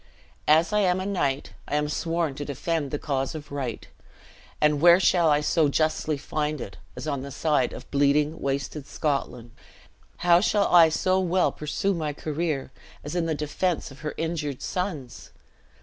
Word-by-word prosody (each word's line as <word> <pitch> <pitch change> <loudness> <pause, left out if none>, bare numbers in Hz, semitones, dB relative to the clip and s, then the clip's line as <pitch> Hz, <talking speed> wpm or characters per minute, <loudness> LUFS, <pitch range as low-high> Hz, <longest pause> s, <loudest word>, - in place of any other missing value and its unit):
As 160 +6 +4
I 210 - +3
am 185 -2 +2
a 185 - -3
knight, 145 -9 -1
I 145 - -2
am 150 0 +1
sworn 165 0 -1
to 145 +2 -5
defend 145 +1 -2
the 145 - -2
cause 135 -1 -2
of 150 -2 -8
right; 130 -6 -4 0.7
and 150 -1 +3
where 175 +1 +8
shall 175 -3 +4
I 145 0 +3
so 155 +1 +2
justly 155 0 0
find 150 +1 -2
it, 100 - -8 0.2
as - - -6
on 140 -3 -2
the 140 - -7
side 145 -2 +1
of - - -10
bleeding, 145 +2 +2
wasted 140 +1 -3
Scotland? 130 -6 -2 0.7
How 175 0 +6
shall 205 0 +2
I 170 -2 +8
so 185 +4 +1
well 185 0 +2
pursue 155 +6 -1
my 155 -4 -2
career 150 -2 -3 0.3
as 145 - -6
in 170 -2 0
the 160 - 0
defense 150 +2 -2
of 135 - -13
her 150 -1 -5
injured 160 -5 -3
sons? 165 - -4
150 Hz, 175 wpm, -26 LUFS, 140-170 Hz, 0.7 s, where